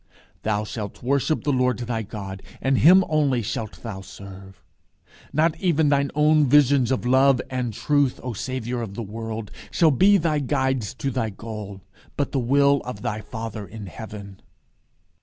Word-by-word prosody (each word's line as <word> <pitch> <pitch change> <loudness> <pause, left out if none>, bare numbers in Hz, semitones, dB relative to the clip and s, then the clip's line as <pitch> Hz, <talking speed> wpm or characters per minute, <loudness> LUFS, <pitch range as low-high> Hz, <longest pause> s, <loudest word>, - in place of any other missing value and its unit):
"Thou 105 -1 0
shalt 105 -1 -6
worship 140 +4 +1
the 145 - +1
Lord 125 -1 +2
thy 120 -2 -3
God, 100 -3 -7 0.2
and 135 0 +1
him 185 +5 +7
only 140 -6 +1
shalt 110 +1 -5
thou 105 -5 -6
serve." 95 0 -12 0.7
Not 155 +3 +2
even 160 -5 +2
thine 140 -1 +2
own 150 0 +4
visions 140 -2 +4
of 130 -2 -1
love 130 +1 +4
and 125 -2 -2
truth, 145 +4 +1
O 125 -1 -3
Saviour 125 +1 -3
of 100 -4 -6
the 115 - -4
world, 110 0 -6 0.2
shall 165 -3 +4
be 195 +9 +5
thy 160 -4 +1
guides 130 -5 -1
to 135 - -2
thy 115 -3 -1
goal, 105 -2 -8 0.4
but 145 - -1
the 135 - 0
will 140 +3 +3
of 115 -5 -7
thy 105 +1 -2
Father 110 -2 -6
in 110 -1 -9
heaven. 100 0 -9
125 Hz, 165 wpm, -24 LUFS, 110-140 Hz, 0.7 s, him